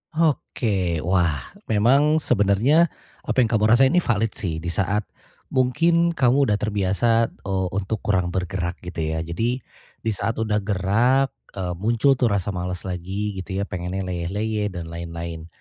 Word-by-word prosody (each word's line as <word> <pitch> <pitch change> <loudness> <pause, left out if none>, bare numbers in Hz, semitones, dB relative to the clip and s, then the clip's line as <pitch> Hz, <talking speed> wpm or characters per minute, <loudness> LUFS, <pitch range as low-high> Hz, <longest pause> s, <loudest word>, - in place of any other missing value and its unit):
Oke. 100 - 0
Wah, 85 -7 0 0.2
memang, 135 +8 +4
sebenarnya 110 - +3 0.4
apa - - -1
yang 110 - 0
kamu 110 -2 +2
rasain 130 +4 +5
ini 180 - +4
valid 110 -7 0
sih. 85 -5 -4
Di 85 - -2
saat 100 +3 0 0.5
mungkin 165 +6 +2
kamu 135 +2 +3
udah 105 -1 +2
terbiasa, 110 +3 +1
eee, 95 -2 -3
untuk 100 +2 -2
kurang 90 -4 0
bergerak 90 -1 -3
gitu 90 -2 -8
ya. 80 +1 -1
Jadi, 115 +11 -2 0.4
di 110 - -1
saat 115 +3 -2
udah 105 -2 0
gerak, 110 +7 +2 0.2
eee, 90 -2 -3
muncul 115 +8 +2
tuh 120 -4 +1
rasa 100 -1 -1
males 90 +1 -4
lagi 95 +3 -3
gitu 95 +1 -4
ya, - - 0
pengennya 90 +1 -4
leyeh-leyeh 105 +4 -2
dan 85 -2 -6
lain-lain, 85 -1 -6
100 Hz, 155 wpm, -23 LUFS, 90-115 Hz, 0.5 s, rasain